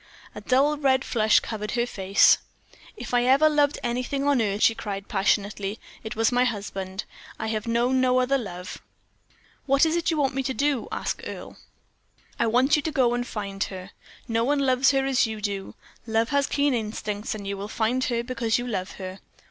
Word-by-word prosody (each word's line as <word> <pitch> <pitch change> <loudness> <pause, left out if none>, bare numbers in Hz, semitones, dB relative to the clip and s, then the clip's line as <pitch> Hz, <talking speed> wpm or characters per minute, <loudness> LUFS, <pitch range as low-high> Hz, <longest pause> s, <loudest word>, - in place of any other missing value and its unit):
A - - -8
dull 280 +4 +2
red 265 -2 +2
flush 220 -2 +3
covered 210 -1 -5
her 240 0 +1
face. 195 -4 +4 0.6
"If - - -7
ever 255 +5 +4
I - - +8
loved 295 -1 +2
anything 250 +3 -2
on 280 -4 +3
earth," 205 -1 0
she 225 - +6
cried, 200 -3 -6
passionately, 200 +1 0 0.2
"it 220 - -6
was 225 +2 +2
my 245 0 +3
husband 195 -4 -3 0.3
I - - -4
have 215 0 -3
known 245 +3 +2
no 255 0 +3
other 265 +2 +2
love." 180 -5 -7 0.9
"What 275 +3 +4
is 320 - +1
that 340 -1 0
you 325 - 0
want 275 -2 +1
me 270 - -1
to 265 -1 -3
do?" 280 -1 0
asked - - -3
Earle. - - -8 0.8
"I - - +2
want 255 +5 +3
you 300 - +1
to 315 - -3
go 255 -5 +2
and 245 0 -2
find 200 -3 -3
her. 190 0 -9 0.4
No 230 0 +1
one 290 +4 +1
loves 260 0 +3
her 270 -1 +2
as 260 -3 +2
you 220 -1 -5
do. 200 -2 -4 0.3
Love 225 0 +1
has 280 0 +1
keen 285 -1 +1
instincts; 215 -2 -3
you 200 0 -4
will 200 +1 -6
find 230 +4 0
her 235 -1 -1
because 235 -2 0
you 245 - -4
love 205 -5 -3
her. 185 0 -8
235 Hz, 195 wpm, -25 LUFS, 210-270 Hz, 0.9 s, I